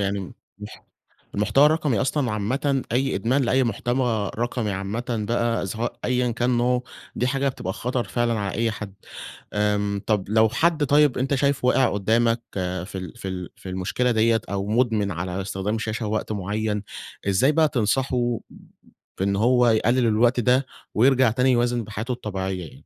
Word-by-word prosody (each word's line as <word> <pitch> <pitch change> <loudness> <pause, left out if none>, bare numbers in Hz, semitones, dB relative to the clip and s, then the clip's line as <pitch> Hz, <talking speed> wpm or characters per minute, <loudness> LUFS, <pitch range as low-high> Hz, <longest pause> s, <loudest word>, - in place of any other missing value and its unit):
يعني 100 0 0 0.4
المح 105 +1 -10 0.5
المحتوى 105 +8 +4
الرقمي 150 -8 +1
أصلًا 135 -2 0
عامةً، 130 +6 0
أي 135 +2 +1
إدمان 120 +8 +1
لأي 130 +2 +2
محتوى 120 -2 -1
رقمي 120 -2 -1
عامةً 100 +5 -3 0.2
بقى، 115 -2 0
سواء 110 +5 -4
أيًا 125 -1 +1
كان 120 +2 0
نوعه، 125 +1 +1 0.3
دي 125 - +1
حاجة 135 +1 0
بتبقى 95 -8 -4
خطر 120 +4 -2
فعلًا 120 -2 0
على 100 -2 -3
أي 115 +2 +1
حد. 105 -3 -7 0.6
آمم، 105 -1 0
طب، 105 -3 +1
لو 110 +1 +4
حد 155 +6 +1
طيب 145 -1 +4
أنت 135 +2 0
شايفه 140 -2 +1
واقِع 130 0 +4
قدامك 115 +3 +2
في 90 0 -3
ال 95 +3 -6
في 100 -5 -6
ال 90 -2 -5
في - - -10
المشكلة 95 +7 -1
ديّة 115 0 +3
أو 100 0 -2
مدمن 110 -2 +1
على 90 +2 -3
استخدام 95 +2 -3
الشاشة 110 0 -3
وقت 110 +1 -2
معين، 105 +1 -2 0.5
إزاي 115 +10 +3
بقى 160 0 +3
تنصحه 120 0 0 0.8
بإن 100 +1 +1
هو 125 +3 +4
يقلل 115 +2 +3
الوقت 120 +3 +3
ده 125 +3 +2 0.3
ويرجع 130 +1 +4
تاني 125 +3 +2
يوازن 120 -1 +1
بحياته 110 +3 -4
الطبيعية 95 -5 -3
يعني؟ 80 -4 -9
115 Hz, 165 wpm, -24 LUFS, 100-125 Hz, 0.8 s, المحتوى